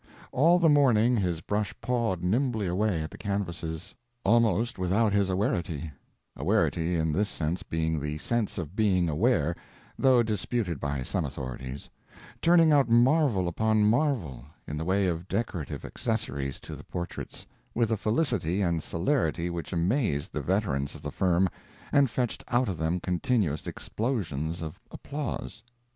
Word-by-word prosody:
All 165 Hz, +7 st, +5 dB
the 170 Hz, -2 st, +4 dB
morning 125 Hz, -6 st, +5 dB
his 90 Hz, -6 st, 0 dB
brush 105 Hz, +4 st, -2 dB
pawed 115 Hz, -8 st, -1 dB
nimbly 110 Hz, +2 st, +1 dB
away 90 Hz, -2 st, 0 dB
at 80 Hz, -, -6 dB
the -, -, -11 dB
canvases, 90 Hz, -3 st, -4 dB, 0.3 s
almost 115 Hz, 0 st, +2 dB
without 100 Hz, +4 st, +2 dB
his 100 Hz, -2 st, +2 dB
awarity—awarity, 85 Hz, 0 st, -1 dB
in 80 Hz, -2 st, +1 dB
this 105 Hz, +5 st, +1 dB
sense 80 Hz, +2 st, -2 dB
being 80 Hz, -1 st, -1 dB
the 75 Hz, +1 st, -3 dB
sense 115 Hz, +6 st, -1 dB
of 85 Hz, 0 st, -5 dB
being 95 Hz, -5 st, +2 dB
aware, 85 Hz, -, +2 dB, 0.4 s
though 130 Hz, -3 st, +5 dB
disputed 105 Hz, -, -2 dB
by 70 Hz, -2 st, -2 dB
some -, -, -1 dB
authorities—turning 70 Hz, -, -1 dB
out 140 Hz, -5 st, +4 dB
marvel 120 Hz, -, +4 dB
upon 110 Hz, +5 st, +2 dB
marvel, 110 Hz, -, +1 dB, 0.2 s
in 75 Hz, -, -4 dB
the 80 Hz, +2 st, -3 dB
way 95 Hz, +2 st, +2 dB
of 85 Hz, 0 st, -2 dB
decorative 95 Hz, -, -3 dB
accessories 70 Hz, -1 st, -3 dB
to -, -, -7 dB
the -, -, -11 dB
portraits, 85 Hz, 0 st, -6 dB, 0.3 s
with 115 Hz, -1 st, +1 dB
a -, -, +3 dB
felicity 105 Hz, -, 0 dB
and 85 Hz, -3 st, +1 dB
celerity 85 Hz, -, 0 dB
which 85 Hz, -1 st, -5 dB
amazed 90 Hz, -, 0 dB
the 75 Hz, -, -2 dB
veterans 70 Hz, -5 st, -1 dB
of -, -, -11 dB
the -, -, -4 dB
firm 90 Hz, 0 st, +2 dB, 0.4 s
and 140 Hz, -2 st, +4 dB
fetched 120 Hz, 0 st, -2 dB
out 120 Hz, +1 st, +2 dB
of 90 Hz, -5 st, -3 dB
them 80 Hz, +3 st, 0 dB
continuous 90 Hz, -, 0 dB
explosions 85 Hz, -, -3 dB
of 80 Hz, -1 st, -7 dB
applause. 145 Hz, -5 st, -5 dB
95 Hz, 145 wpm, -28 LUFS, 80-115 Hz, 0.4 s, All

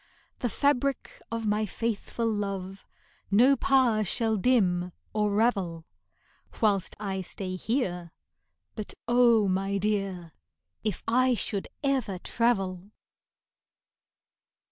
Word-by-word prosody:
The 245 Hz, -, -1 dB
fabric 275 Hz, +1 st, 0 dB
of 230 Hz, -1 st, -3 dB
my 210 Hz, 0 st, +1 dB
faithful 230 Hz, +2 st, -3 dB
love 195 Hz, -3 st, -3 dB, 0.4 s
No 245 Hz, +8 st, +5 dB
power 255 Hz, -6 st, +3 dB
shall 220 Hz, +3 st, 0 dB
dim 185 Hz, -6 st, +2 dB, 0.2 s
or 210 Hz, -1 st, +1 dB
ravel 190 Hz, -8 st, +1 dB, 0.7 s
Whilst 200 Hz, -4 st, +1 dB
I 195 Hz, -2 st, -3 dB
stay 185 Hz, 0 st, -5 dB
here, 185 Hz, -, -2 dB, 0.6 s
but 215 Hz, -, -6 dB
oh, 235 Hz, -3 st, +5 dB
my 195 Hz, +1 st, 0 dB
dear, 195 Hz, -4 st, -1 dB, 0.5 s
If 215 Hz, -4 st, -2 dB
I 255 Hz, +2 st, +3 dB
should 200 Hz, -1 st, -3 dB, 0.2 s
ever 260 Hz, -9 st, 0 dB
travel! 195 Hz, -3 st, 0 dB
210 Hz, 100 wpm, -28 LUFS, 190-235 Hz, 0.7 s, No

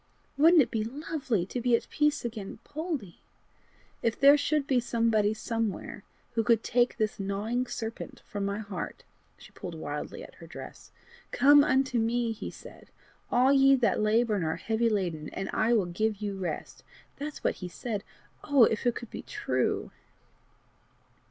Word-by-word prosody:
Wouldn't 315 Hz, +2 st, +6 dB
it -, -, -8 dB
be 220 Hz, -2 st, 0 dB
lovely 255 Hz, -, -2 dB
to 245 Hz, +6 st, -4 dB
be 245 Hz, 0 st, +4 dB
at -, -, -2 dB
peace 300 Hz, -2 st, +1 dB
again, 215 Hz, -4 st, -5 dB
Poldie? 295 Hz, -, -5 dB, 0.8 s
If 230 Hz, -1 st, 0 dB
there 280 Hz, +1 st, +8 dB
should 295 Hz, 0 st, +1 dB
be 265 Hz, -3 st, +2 dB
somebody 230 Hz, -3 st, +2 dB
somewhere 225 Hz, -1 st, -3 dB, 0.3 s
who 225 Hz, -, +1 dB
could 230 Hz, -1 st, +3 dB
take 245 Hz, +1 st, +2 dB
this 215 Hz, -2 st, -1 dB
gnawing 210 Hz, +6 st, -2 dB
serpent 225 Hz, -1 st, -6 dB
from 205 Hz, -2 st, -4 dB
my 200 Hz, +1 st, -1 dB
heart!" 200 Hz, -5 st, -6 dB, 0.3 s
She -, -, -15 dB
pulled 175 Hz, -3 st, -8 dB
wildly 155 Hz, -, -5 dB
at -, -, -12 dB
her -, -, -10 dB
dress. -, -, -10 dB, 0.4 s
"'Come 285 Hz, +1 st, +6 dB
unto 265 Hz, -3 st, +2 dB
me,' 230 Hz, +1 st, +1 dB
he 220 Hz, -, -5 dB
said, -, -, -13 dB, 0.4 s
'all 255 Hz, +3 st, +4 dB
ye 275 Hz, 0 st, +6 dB
that 240 Hz, -4 st, +1 dB
labour 220 Hz, +2 st, +2 dB
and 185 Hz, -, -1 dB
are 160 Hz, -, 0 dB
heavy 225 Hz, +1 st, 0 dB
laden, 175 Hz, -8 st, -2 dB
and 195 Hz, -, -4 dB
I 225 Hz, +2 st, +2 dB
will 215 Hz, -5 st, +3 dB
give 210 Hz, +5 st, -1 dB
you 205 Hz, -1 st, -4 dB
rest.' 180 Hz, -5 st, -5 dB, 0.3 s
That's 295 Hz, +1 st, -6 dB
what -, -, 0 dB
he 180 Hz, -, -4 dB
said: 210 Hz, +3 st, -4 dB, 0.4 s
oh! 285 Hz, -4 st, +5 dB
if 225 Hz, +2 st, +2 dB
it 240 Hz, -, +2 dB
could 235 Hz, -, -8 dB
be -, -, -6 dB
true!" -, -, -1 dB
230 Hz, 170 wpm, -29 LUFS, 205-260 Hz, 0.8 s, there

